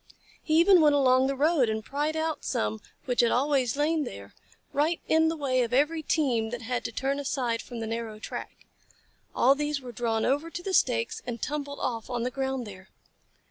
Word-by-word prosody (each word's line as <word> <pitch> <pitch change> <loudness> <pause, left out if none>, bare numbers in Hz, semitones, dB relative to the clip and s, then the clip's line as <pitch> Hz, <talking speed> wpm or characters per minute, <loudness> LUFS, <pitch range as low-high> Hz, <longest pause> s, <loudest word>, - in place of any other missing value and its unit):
He 310 - 0
even 360 0 +6
went 295 -2 +5
along 260 -1 +4
the 275 - -1
road 285 -3 +3
and 220 0 -3
pried 295 +3 -2
out 320 0 -2
some 105 0 -2 0.2
which 250 -3 +2
had 235 - +3
always 270 -1 +1
lain 305 +1 +1
there, 100 - -9 0.4
right 310 +4 +1
in 320 0 +4
the 325 0 -1
way 260 -3 +1
of 240 0 -2
every 300 +5 +2
team 255 -8 0
that 240 0 -6
had 245 +1 -2
to - - -2
turn 275 +1 -1
aside 250 -4 -1
from 240 -2 -8
the - - -2
narrow 225 -1 -4
track. 215 - -8 0.7
All 260 +3 +5
these 295 0 -2
were 250 -2 -9
drawn 230 -2 -1
over 290 +5 0
to 350 +1 -7
the 385 - -3
stakes 235 -8 +1
and 235 -1 -4
tumbled 285 +1 -4
off 230 -2 -3
on 240 -2 -2
the 250 - -1
ground 265 -1 -2
there. 190 -2 -11
265 Hz, 205 wpm, -27 LUFS, 235-295 Hz, 0.7 s, even